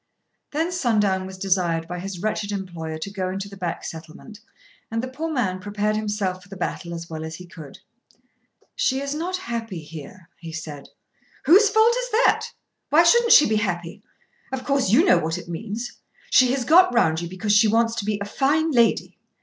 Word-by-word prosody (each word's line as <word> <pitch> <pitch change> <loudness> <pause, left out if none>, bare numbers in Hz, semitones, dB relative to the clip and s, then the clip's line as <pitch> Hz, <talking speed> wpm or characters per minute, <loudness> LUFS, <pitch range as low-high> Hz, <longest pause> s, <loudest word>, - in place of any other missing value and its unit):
Then 320 +4 -1
Sundown 210 - +1
was 190 0 -9
desired 180 -4 0
by 180 +1 -5
his 185 0 -6
wretched 215 -1 -2
employer 170 -5 -5
to 180 +5 -6
go 190 -2 -3
into 195 +1 -4
the 200 - -11
back 180 -3 -4
settlement 165 +7 -10 0.5
and 225 +1 -2
the - - -3
poor 310 +5 -4
man 205 -10 -1
prepared 205 +2 -1
himself 205 -4 -2
for 180 - -19
the 195 - -9
battle 175 -1 -4
as 170 0 -7
well 160 -1 -6
as 160 0 -6
he 180 - -10
could. 155 -5 -12 1.0
"She 280 - +1
is 280 +1 -3
not 350 +5 -2
happy 230 - -5
here," 165 +2 -10
he 165 -1 -8
said. 155 -3 -7 0.6
"Whose 395 +9 +6
fault 440 +2 +4
is - - -2
that? - - +3 0.4
Why 320 +3 +6
shouldn't 470 +6 +5
she 295 - +8
be 215 0 +1
happy? 175 -5 -3 0.5
Of 265 -1 -4
course 275 -6 +1
you 265 - +5
know 375 - +5
what 160 +2 -2
it 175 - -9
means. 215 +7 -6 0.3
She 255 -1 +5
has 265 -3 -2
got 360 +6 +6
round 165 -9 +2
you 170 - -5
because 205 +3 0
she 215 +1 +6
wants 230 +1 +2
to 205 - -2
be 210 -1 0
a 200 - -4
fine 295 +9 +1
lady. 235 -4 +2
205 Hz, 200 wpm, -23 LUFS, 175-260 Hz, 1.0 s, she